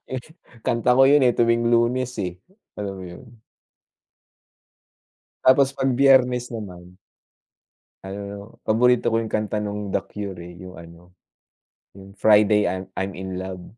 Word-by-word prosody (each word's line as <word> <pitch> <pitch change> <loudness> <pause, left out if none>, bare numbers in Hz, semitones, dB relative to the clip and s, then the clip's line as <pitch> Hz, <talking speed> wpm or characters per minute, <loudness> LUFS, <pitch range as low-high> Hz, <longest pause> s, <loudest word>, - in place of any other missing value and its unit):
Eh, 130 -1 -4 0.4
kanta 125 0 +2
ko 135 - +7
'yon, 145 +2 +5
eh, 125 -2 +3
tuwing 115 0 +2
Lunes, 120 +2 +1
eh, 90 -3 -5 0.4
alam 100 -1 -5
mo 95 - -9
'yon. 85 +5 -11 2.2
Tapos 135 +1 +5
'pag 135 -1 -1
Biyernes 125 -3 +3
naman 90 -5 -9 1.1
ano, 95 +1 -6
'no, 100 - -8 0.3
paborito 120 +1 +2
ko 115 - +2
'yong 115 - -4
kanta 105 0 -1
no'ng 105 -1 -5
The - - +1
Cure, 100 -4 -7
eh. 85 0 -11
'Yong, 90 +1 -11
ano, 85 +1 -14 0.8
'yong, 95 0 -13
Friday 105 -1 +4
I'm 95 +1 -4
I'm 95 +1 -4
in 95 0 -6
Love. 95 -1 -7
105 Hz, 145 wpm, -23 LUFS, 95-125 Hz, 2.2 s, ko